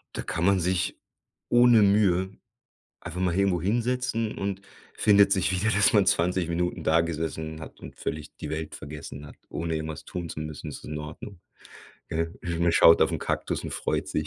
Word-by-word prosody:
Da - - -3
kann 85 - -3
man 95 0 +4
sich 90 +1 -1 0.5
ohne 120 -2 +6
Mühe, 100 -2 +3 0.6
einfach 90 - -6
mal 90 -2 +1
irgendwo 95 -3 +2
hinsetzen 115 +2 -1
und 100 0 -3 0.3
findet 100 -1 +5
sich 95 0 +1
wieder, 95 +4 +1
dass 105 +6 +4
man 100 -3 +4
20 90 -2 +1
Minuten 90 +1 -2
da 80 +1 +4
gesessen 80 -1 -3
hat - - -11
und - - -11
völlig 75 0 -5
die 75 - -6
Welt 80 0 -4
vergessen 75 0 -8
hat. - - -13
Ohne 80 -1 -3
irgendwas 80 -1 -5
tun 85 -2 -5
zu 75 - -6
müssen, 75 0 -6
ist - - -7
es - - -18
in 75 0 -5
Ordnung, 80 +5 -9 0.7
gell? 80 +1 -2 0.3
Man 85 - +3
schaut 80 - +7
auf - - +2
'n - - -2
Kaktus - - -2
und - - -5
freut - - -2
sich. 75 - -2
90 Hz, 190 wpm, -26 LUFS, 80-100 Hz, 0.7 s, schaut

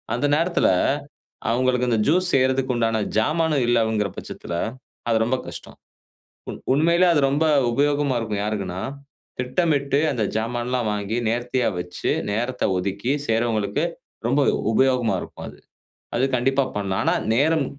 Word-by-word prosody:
அந்த 125 - -1
நேரத்துல, 170 +3 +2 0.8
அவங்களுக்கு 125 +1 +1
இந்த 115 -2 +2
ஜூஸ் 180 +3 +2
செய்யறதுக்கு 130 0 +2
உண்டான 115 -1 +1 0.2
சாமானும் 155 +2 +1
இல்லவங்குற 110 -3 +2
பட்சத்துல, 85 - -6 0.5
அது 115 - +3
ரொம்ப 130 +3 0
கஷ்டம். - - -9 0.7
உ - - -2 0.2
உண்மையிலயே 170 +5 +4
அது 150 - +3
ரொம்ப 145 +4 +1 0.3
உபயோகமா 145 +1 +1
இருக்கும், 105 -3 -3
யாருக்குன்னா? 100 -4 -3 0.6
திட்டமிட்டு, 140 +1 +1
அந்த 120 -5 -1
சாமான்லாம் 120 +1 -1
வாங்கி, 105 +2 -2
நேர்த்தியா 120 +2 0
வைச்சு, 90 0 -3 0.2
நேரத்த 120 +4 -2
ஒதுக்கி 100 +6 -2 0.2
செய்றவங்களுக்கு 110 +2 0 0.4
ரொம்ப 135 +4 +2 0.3
உபயோகமா 125 0 +2
இருக்கும், - - -9
அது. - - -15 0.6
அது 125 - +2
கண்டிப்பா 135 +2 +2
பண்ணலாம். 95 -2 -1
ஆனா - - +3 0.2
நேரம் 150 +4 +3
125 Hz, 130 wpm, -23 LUFS, 110-140 Hz, 0.8 s, உண்மையிலயே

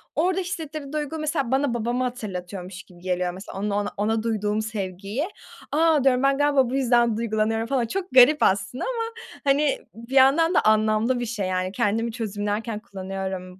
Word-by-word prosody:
orada 365 +3 +1
hissettirdiği 310 -5 -6
duygu, 305 +1 -3
mesela, 295 -5 -1
bana 265 -1 +1
babamı 240 +2 -1
hatırlatıyormuş 190 -6 -5
gibi 175 -2 -18
geliyor, 180 -1 -1
mesela 190 +1 -8
onunla 205 0 -1
ona 205 - -4
ona 220 +2 0
duyduğum 215 -2 0
sevgiyi. 210 - -4 0.4
A, 315 -1 +3
diyorum, 260 -1 +3
ben 275 0 +3
galiba 285 -3 +3
bu 260 - -2
yüzden 240 -4 +3
duygulanıyorum 225 0 0
falan. 260 -2 +1
Çok 370 +10 -3
garip 260 +4 +7
aslında 195 +5 +1
ama, 460 -2 -3 0.3
hani, 280 +1 +2
bir 235 +4 -8
yandan 285 +6 +5
da - - +4
anlamlı 215 +3 +2
bir 240 - -2
şey, 215 -4 -3
yani. 185 0 -1
Kendimi 225 +1 0
çözümlerken 210 0 -3
kullanıyorum 190 -2 -6
230 Hz, 170 wpm, -24 LUFS, 205-275 Hz, 0.4 s, garip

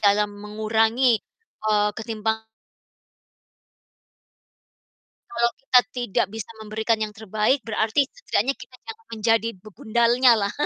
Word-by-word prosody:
dalam 205 0 +3
mengurangi, 220 +3 +1 0.5
eee, 210 -1 +3
ketimpang 220 0 -3 2.8
Kalau 235 -11 +1
kita 255 -2 +5 0.2
tidak 240 -5 0
bisa 225 +1 -7
memberikan 220 +1 -1
yang 215 -1 -3
terbaik 220 +5 0
berarti 225 +5 +1
setidaknya 275 - -1
kita 255 - -14
jangan 450 0 -9
menjadi 225 0 +1
begundalnya 235 +5 +3
lah. 200 - -4
220 Hz, 100 wpm, -24 LUFS, 215-240 Hz, 2.8 s, kita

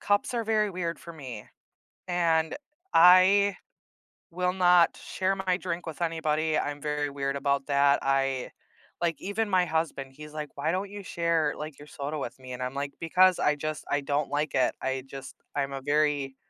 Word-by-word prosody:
Cups 205 +5 +1
are 230 -2 -1
very 215 -2 +1
weird 170 -2 -3
for 170 - -10
me 130 -9 -8 0.6
and 165 -2 +1 0.4
I 185 +3 +6 0.7
will 180 +1 0
not 180 -2 +4
share 190 +1 -2
my 190 -1 0
drink 175 -2 -4
with 160 +1 -6
anybody, 155 -2 0
I'm 145 0 -3
very 150 0 -1
weird 140 0 -2
about 140 0 0
that, 140 0 +4
I 135 -1 0 0.5
like, 170 -2 0
even 205 +2 -2
my 185 -2 +3
husband, 155 -5 -2
he's 150 +1 -11
like, 150 -2 -7
"Why 145 +3 0
don't 190 +2 -2
you 205 0 -7
share, 170 -4 0
like, 150 -1 -7
your 145 - -12
soda 145 +2 -5
with 140 - -5
me?" 130 -1 -9
And 125 - -6
I'm 125 0 -2
like, 140 0 -3
"Because 180 +2 +4
I 150 - +3
just 155 +1 -4
I 145 - +2
don't 140 +1 -1
like 145 +1 -1
it," 130 -2 +2
I 130 0 -2
just 135 0 -9 0.2
I'm 140 -1 -1
a 135 - -5
very 145 -2 +1
155 Hz, 185 wpm, -28 LUFS, 140-180 Hz, 0.7 s, I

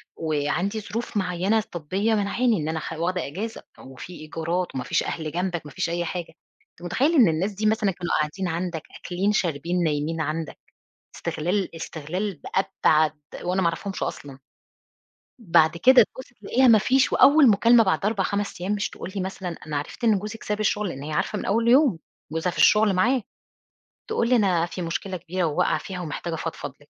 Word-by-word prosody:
وعندي 165 +7 -1
ظروف 225 +1 -4
معيَّنة 190 +4 +1
طبية 185 +7 -1
مانعاني 215 +3 +1
إن 155 -2 -3
أنا 160 - -2
أخ 160 - -6
واخدة 170 +2 -2
إجازة. 205 +10 -6
طَب - - -14
وفي 135 +7 -10
إيجارات 165 +2 -3
وما 130 - -2
فيش - - 0
أهل 155 -2 -4
جنبَك، 175 -1 -2
ما 150 - -9
فيش 185 0 -2
أي 175 0 -1
حاجة. 175 -1 -5 0.4
أنتَ - - -24
متخيّل 265 - +1
إن 250 -8 +7
الناس 170 +6 0
دي 210 +2 -4
مثلًا 215 -2 +2
كانوا 175 -1 -5
قاعدين 155 +5 -2
عندَك، 170 -1 -3 0.2
أكِلين، 190 +3 -1
شاربين، 175 -2 0
نايمين 155 +1 -1
عندِك، 155 +1 -4 0.6
استِغلال 180 +3 -2
استِغلال 165 +3 -4 0.4
بأبعَد 155 -1 +4 0.3
وأنا 180 +2 0
ما 170 - +3
أعرفهمش 195 +4 -3
أصلًا. 135 -2 -6 1.0
بعد 165 -6 +3
كده 255 +6 +7
تبُصّ 260 +3 -11
تلاقِيها 255 +5 +3
ما 220 -2 +7
فيش، 260 +5 +2
وأوَّل 280 -3 +7
مكالمة 230 +3 +5
بعد 190 0 0
4،5 200 -2 -1
أيَّام، 195 +3 -1
مش 205 0 -1
تقول 185 - -8
لي 195 - -1
مثلًا: 190 -1 -4 0.2
"أنا 150 - -2
عرفت 150 - -7
إن 220 -4 +4
جوزك 210 +2 -7
ساب 210 0 -2
الشغل،" 210 -1 0
لأن 135 -4 -7
هي 155 - -6
عارِفة 210 - -1
من - - -5
أوَّل 230 +3 +1
يوم، 255 - +5 0.3
جوزها 165 +2 -1
في - - -10
الشغل 210 -1 +5
معاه. 240 +5 +2 0.8
تقول 235 - 0
لي: 250 - +5
"أنا 185 -7 +2
في 175 +1 -7
مشكلة 180 +2 -3
كبيرة 180 +2 -3
وواقعة 150 -2 +1
فيها 185 -2 -6
ومحتاجة 165 +1 -4
أفضفض 160 -3 -5
لِك." 145 - -22
185 Hz, 185 wpm, -24 LUFS, 165-210 Hz, 1.0 s, إن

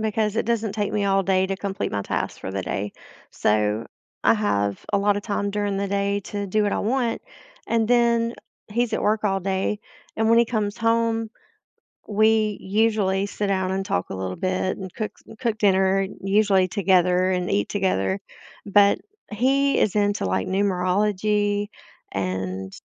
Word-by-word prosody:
because 215 0 0
it - - 0
doesn't 225 -3 0
take 205 -1 -2
me 205 -1 0
all 195 0 +2
day 190 0 +2
to 195 0 -2
complete 200 0 -3
my 100 -1 -1
tasks - - -3
for - - -6
the 95 0 -3
day, 100 +2 -3 0.4
so 105 +1 +1 0.4
I - - +6
have 100 - -1
a - - +4
lotta 205 0 +2
time 205 -1 -2
during 205 -1 -1
the 200 - -1
day 200 0 0
to 205 -1 -4
do 210 +2 +1
what 205 - 0
I - - 0
want, 240 +1 0 0.5
and 230 -1 +2
then 235 0 +2 0.4
he's 235 +2 0
at - - -1
work 215 +1 +1
all 195 -1 +2
day, 195 +2 -1 0.4
and 220 0 +1
when 230 0 +6
he 235 - +5
comes 215 -3 -2
home, 230 -1 +1 0.8
we 215 0 +2
usually 200 -1 +1
sit 205 0 -3
down 190 -1 0
and 195 0 -1
talk 90 - -2
a - - -4
little 95 -1 -4
bit 185 0 -1
and 190 -2 -8
cooks 215 0 -6 0.2
cook 230 -4 -1
dinner 195 -1 +3 0.2
usually 195 -1 +3
together 185 -1 +3
and 180 -1 -1
eat 100 - +1
together. 100 - 0 0.5
But 200 0 +5 0.3
he 270 +5 +2
is 200 - +2
into, 205 - +1
like, 95 0 -1
numerology 205 +2 +1 0.4
and 95 0 -3
200 Hz, 170 wpm, -23 LUFS, 185-215 Hz, 0.8 s, I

